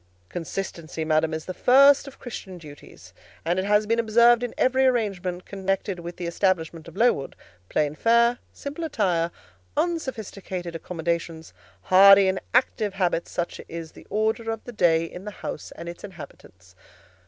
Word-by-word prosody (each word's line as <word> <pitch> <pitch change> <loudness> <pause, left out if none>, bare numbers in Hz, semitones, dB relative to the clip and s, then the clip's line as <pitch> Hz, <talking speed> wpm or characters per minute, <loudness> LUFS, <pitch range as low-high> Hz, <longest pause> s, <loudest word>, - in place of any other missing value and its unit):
"Consistency, 170 -2 -5
madam, 155 0 +2
is 160 0 -4
the 185 - -5
first 275 +7 +5
of 275 - -11
Christian 195 -6 -8
duties; 150 -4 -14 0.3
and 175 +3 +1
it 190 - -1
has 210 +1 +3
been 230 +2 +1
observed 235 +1 +5
in 245 - -4
every 260 +1 +3
arrangement 190 -7 -1
connected 195 -1 -2
with 175 0 -8
the 180 - -5
establishment 170 -2 -1
of - - -12
Lowood: 225 - +2 0.3
plain 150 -1 0
fare, 235 +6 +3
simple 290 +4 -7
attire, 180 - 0 0.5
unsophisticated 205 - -3
accommodations, 165 -1 -4 0.3
hardy 195 +1 +7
and 190 0 0
active 220 -5 +1
habits; 180 -3 0
such 175 - -4
is 165 -1 -7
the - - -16
order 220 +2 0
of 225 -1 -4
the 245 - -8
day 165 -5 +3
in 180 +2 -9
the 210 - -5 0.2
house - - -5
and 170 - -8
its 170 0 -8
inhabitants." 95 - -12
190 Hz, 155 wpm, -25 LUFS, 170-225 Hz, 0.5 s, hardy